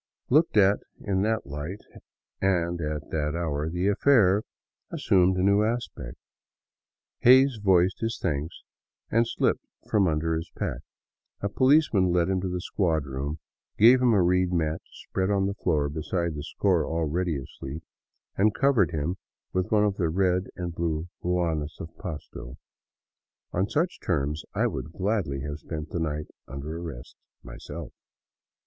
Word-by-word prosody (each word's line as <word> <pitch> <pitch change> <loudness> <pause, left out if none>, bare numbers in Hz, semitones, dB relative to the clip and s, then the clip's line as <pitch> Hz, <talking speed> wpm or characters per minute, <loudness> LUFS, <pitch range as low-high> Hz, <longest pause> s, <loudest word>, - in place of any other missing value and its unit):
Looked 155 -3 +4
at 100 0 +5 0.2
in 95 -2 -1
that 110 +2 0
light, 75 +8 -6 0.6
and 85 -3 +1
at 75 -1 -4
that 75 0 -1
hour, 80 -3 -1
the 90 +3 -1
affair 105 -3 +4 0.5
as - - -5
sumed 95 0 +4
a 90 - +1
new. 100 +1 +4
aspect. 110 - -3 1.0
Hays 130 -1 +6
voiced 95 -1 +3
his 115 0 -2
thanks 80 -1 -3 0.5
and 115 +1 +3
slipped - - 0 0.2
from 100 -3 +3
under 80 +1 0
his 80 +1 -4
pack. - - -2 0.6
A 100 - -1
policeman 130 - +4
led 85 0 +2
him 95 -1 +1
to 95 - -2
the 90 0 -3
squad 80 -6 0
room, 70 +3 -4 0.4
gave 120 +4 +7
him 125 -2 +4
a 100 -4 +4
reed 90 +1 +2
mat 80 -2 0
to - - -31
spread 95 0 -3
on 100 -1 +2
the 100 - -1
floor 80 -7 0
beside 80 +3 -2
the 75 - -5
score 90 +2 +1
already 80 +1 -1
asleep, 65 +3 -8 0.5
and 105 +2 +3
cov 140 -2 +3
ered 95 -7 +4
him 80 +4 -2 0.4
with 90 0 -1
one 105 -1 +4
of 105 -1 +1
the 85 -4 +1
red 90 +1 +1
and 90 -2 -4
blue 85 0 -2
ruanas 85 -4 -1
of 80 - -8
Pasto. 75 -7 -7 1.0
On 95 +3 0
such 170 +4 0
terms 75 -2 -1
I - - +2
would 80 - -3
gladly 95 -9 -1
have 75 +2 -5
spent 75 0 -6
the 85 - -2
night 75 -2 -2 0.2
under 70 +4 -6
arrest 80 -8 -8 0.3
myself. - - -8
90 Hz, 160 wpm, -27 LUFS, 80-100 Hz, 1.0 s, gave